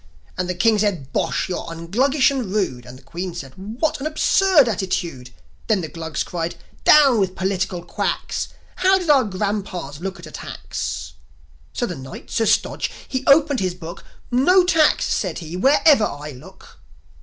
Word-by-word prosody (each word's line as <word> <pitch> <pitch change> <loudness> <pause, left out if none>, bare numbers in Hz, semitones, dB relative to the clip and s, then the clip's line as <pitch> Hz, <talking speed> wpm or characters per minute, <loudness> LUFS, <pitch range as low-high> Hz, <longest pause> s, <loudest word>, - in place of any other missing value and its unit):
And 180 0 -2
the 180 - -1
King 215 +4 +3
said, 180 -10 -1
"Bosh! - - 0
You're 180 -2 -4
un 165 0 -7
Gluggish 270 +5 +3
and 250 -8 -3
rude!" 130 - -2
And 125 +1 -10
the - - -19
Queen 175 0 -6
said, 135 -6 -7
"What 225 - -2
an 280 - -2
absurd 315 -1 +4
attitude!" 175 - -2 0.4
Then 210 -4 +2
the 160 - -5
Glugs 160 -2 -4
cried, 170 -1 -4 0.3
"Down 275 -6 +6
with 190 -2 0
political 190 -2 -2
quacks! 170 - -2 0.3
How 380 +1 +4
did 355 -5 +1
our 275 -3 +5
grandpas 195 - -3
look 195 +2 -5
at 170 - -10
a 155 - -11
tax?" 70 - -5 0.6
So - - -1
the 180 - -4
Knight, 130 -1 -10
Sir 225 - +1
Stodge, - - +1 0.2
he 260 0 -3
opened 285 -1 +5
his 185 -2 -1
Book. 170 0 -9 0.3
"No 355 +10 +5
tax," 320 -4 +3
said - - -1
he, 165 -1 -7
"wherever 275 - +5
I 150 -2 -6
look." 125 -2 -15
190 Hz, 175 wpm, -21 LUFS, 170-265 Hz, 0.6 s, Down